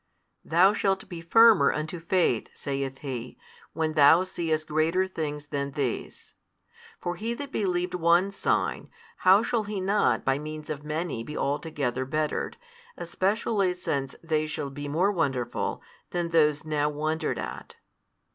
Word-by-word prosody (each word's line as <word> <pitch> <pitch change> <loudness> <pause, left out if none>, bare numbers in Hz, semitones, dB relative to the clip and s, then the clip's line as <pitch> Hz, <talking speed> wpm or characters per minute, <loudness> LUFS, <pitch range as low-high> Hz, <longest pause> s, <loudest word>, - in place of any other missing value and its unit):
Thou 185 +5 +4
shalt 195 -2 0
be 170 -3 -7
firmer 220 -3 +6
unto 155 +3 -4
faith, 170 -8 +1
saith 135 -1 -3
He, 125 -3 -5 0.4
when 160 -1 -1
thou 155 +4 +6
seest 160 -4 -2
greater 160 +5 +2
things 150 -5 -4
than 140 -1 -3
these. 135 -5 -4 0.7
For 175 0 -3
he 225 +6 -3
that 280 +1 -7
believed 180 -5 -1
one 175 +2 +3
sign, - - -1 0.3
how 190 +4 +5
shall 230 -2 0
he 205 -1 -3
not 190 - +1
by 135 +1 +2
means 155 0 -6
of 145 -1 -5
many 155 -5 -3
be 150 +5 -7
altogether 140 -3 -1
bettered, 150 +2 -2 0.4
especially 195 -1 0
since 140 -7 -3
they 155 -2 0
shall 145 -2 -4
be 145 +1 -6
more 175 +8 +2
wonderful 135 -9 -2 0.3
than 175 -1 -2
those 150 -2 +3
now 150 -1 0
wondered 155 +2 -2
at? - - -7
155 Hz, 145 wpm, -27 LUFS, 145-185 Hz, 0.7 s, firmer